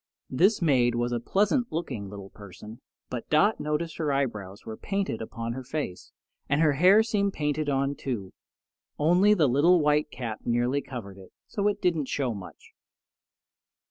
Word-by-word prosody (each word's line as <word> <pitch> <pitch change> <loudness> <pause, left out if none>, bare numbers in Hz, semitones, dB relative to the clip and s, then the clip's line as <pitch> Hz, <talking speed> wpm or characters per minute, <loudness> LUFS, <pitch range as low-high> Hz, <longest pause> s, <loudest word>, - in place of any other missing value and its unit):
This 190 - +3
maid 125 -6 +3
was 120 +1 -1
a 120 - 0
pleasant 210 - +1
looking 115 - -4
little 100 -1 -9
person; 105 +2 -12 0.3
but 125 -2 -5
Dot 180 +8 +3
noticed 150 +2 -2
her 155 -3 -1
eyebrows 105 -8 -3
were 110 - -6
painted 195 - -3
upon 115 +1 -5
her 130 +1 -6
face, 125 -9 -5 0.4
and 145 - +2
her 155 -2 +4
hair 185 +9 +6
seemed 200 -3 0
painted 150 0 -1
on, 140 0 0
too, 115 -10 -5 0.6
only 180 +7 +4
the 160 -7 +3
little 155 +8 +4
white 150 0 +2
cap 120 -5 -5
nearly 120 +4 +1
covered 115 -8 -8
it, 95 - -14
so 205 -1 -1
it 205 - -1
didn't 165 -6 +1
show 130 -4 -1
much. 100 -3 -11
140 Hz, 165 wpm, -27 LUFS, 115-170 Hz, 0.6 s, hair